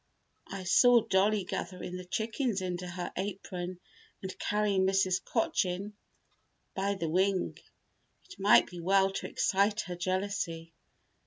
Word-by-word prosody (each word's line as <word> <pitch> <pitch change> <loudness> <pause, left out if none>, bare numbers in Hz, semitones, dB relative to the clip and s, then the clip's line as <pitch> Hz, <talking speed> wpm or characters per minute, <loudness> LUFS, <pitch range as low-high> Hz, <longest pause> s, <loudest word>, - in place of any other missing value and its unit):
I 195 -1 -6
saw 240 +6 +6
Dollie 200 +1 +2
gathering 180 0 -5
the 180 0 -7
chickens 220 +3 -1
into 180 -1 -4
her 175 0 -5
apron 185 -2 -5 0.4
and 190 0 -6
carrying 205 -2 +1
Mrs. 190 -1 +2
Cochin 200 -3 -1 0.8
by 200 +1 -1
the 170 -4 -3
wing. 185 +3 +1 0.7
It 390 - -14
might 200 +2 +6
be 175 - -10
well 195 +2 +3
to - - -4
excite 205 +2 +1
her 180 - -6
jealousy. 180 -3 -3
190 Hz, 130 wpm, -30 LUFS, 180-200 Hz, 0.8 s, saw